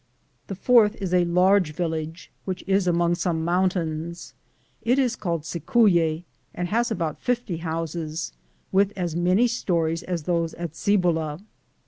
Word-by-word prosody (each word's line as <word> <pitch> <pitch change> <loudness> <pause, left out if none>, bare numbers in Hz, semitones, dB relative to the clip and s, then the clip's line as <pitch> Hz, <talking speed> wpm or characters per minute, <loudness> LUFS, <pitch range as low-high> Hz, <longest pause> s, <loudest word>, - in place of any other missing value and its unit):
The 195 - -5
fourth 220 +1 +4
is 190 -3 -3
a 180 -1 +4
large 180 -1 +3
village 160 0 -4
which 185 -1 -4
is 195 -1 +2
among 170 0 +2
Bome 160 -3 -1
mountains. 170 -2 -1 0.5
It 245 +3 +2
is 250 -3 +2
called 170 -7 -2
Cicuic, 170 - +2 0.3
and 175 0 -3
has 235 +4 +1
about 165 -9 -2
50 240 -8 -1
houses, 165 -1 -4 0.4
with 195 +1 +2
aa 175 -3 -2
many 180 +7 +3
stories 170 -8 0
aa 180 - -1
those 170 -2 0
at 170 -2 -5
Cibola. 170 -6 +1
175 Hz, 140 wpm, -24 LUFS, 165-195 Hz, 0.5 s, fourth